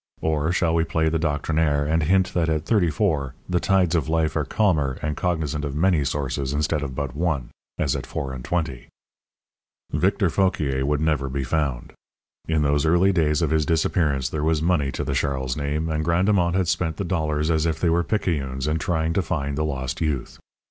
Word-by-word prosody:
Or, 80 0 0
shall 85 -2 +1
we 85 0 +3
play 80 -1 0
the 80 +1 0
doctrinaire, 75 -1 +1
and 80 +2 +1
hint 95 +4 +2
that 85 -2 +1
at 80 0 -1
thirty 95 -5 +2
four 75 - 0
the 90 -1 +1
tides 95 -3 +2
of 80 -4 0
life 80 -1 +1
are 75 -2 0
calmer 75 -8 +1
and 75 0 -1
cognizant 80 -4 -1
of 70 -1 -4
many 85 -1 +2
sources 70 -1 -2
instead 75 +1 0
of 70 -3 -5
but 70 -2 -4
one 75 -6 -1 0.3
as - - 0
at - - -5
four 65 -1 -4
and 65 -1 -7
twenty? 80 -4 -2 1.1
Victor - - +2
Fauquier 75 -9 +1
would 75 0 +1
never 75 -4 0
be 70 +1 -2
found. 70 -3 -2 0.5
In 80 -2 +1
those 75 0 +2
early 90 +4 +4
days 80 -4 +1
of 80 - 0
his 80 -1 +2
disappearance 75 -4 +1
there 75 +1 -3
was 80 0 +2
money 80 -4 +1
to - - -3
the 70 - -2
Charles 65 -1 -1
name, 75 +2 -2
and 80 -1 -1
Grandemont 85 +1 +2
had 95 -2 +1
spent 85 -2 -1
the - - -2
dollars 80 -3 0
as 80 0 +1
if 80 -1 -1
they 85 - +2
were 85 +1 +2
picayunes 70 -10 -1
in 75 +1 0
trying 80 0 0
to 100 - +2
find 70 -6 -2
the 75 - 0
lost 65 -4 -3
youth. 75 -6 -2
80 Hz, 205 wpm, -23 LUFS, 70-85 Hz, 1.1 s, early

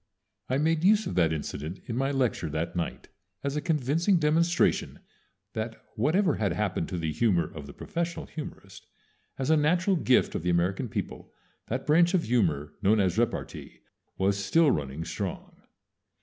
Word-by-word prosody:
_" - - -48 0.5
I 130 - +1
made 160 +2 +1
use 215 +3 +5
of - - -3
that 85 -3 +3
incident 80 +2 -4
in 115 - -4
my 135 +2 0
lecture 125 - 0
that 80 +3 -3
night 85 -1 -4 0.3
as 140 0 -2
a 150 - -1
convincing 165 +4 +2
demonstration 165 +2 +2 0.6
that 110 +1 -4 0.2
whatever 165 - +2
had 100 -5 0
happened 95 -4 -1
to 90 - -3
the 80 -2 -2
humor 85 -1 +2
of 75 -3 -8
the 70 - -10
professional 170 -1 -4
humorist, 100 -10 -9 0.5
as 135 +3 0
a - - +6
natural 175 +6 +2
gift 130 -6 +3
of - - -2
the 90 - -1
American 90 +2 0
people - - -5 0.4
that 130 +3 -3
branch 170 +4 +4
of 175 - +2
humor 80 -11 0
known 105 +2 +4
as 95 +1 +1
repartee 120 0 -3 0.4
was 100 +1 +1
still 155 +9 +4
running 75 +2 -3
strong. - - -5
120 Hz, 170 wpm, -28 LUFS, -, 0.6 s, a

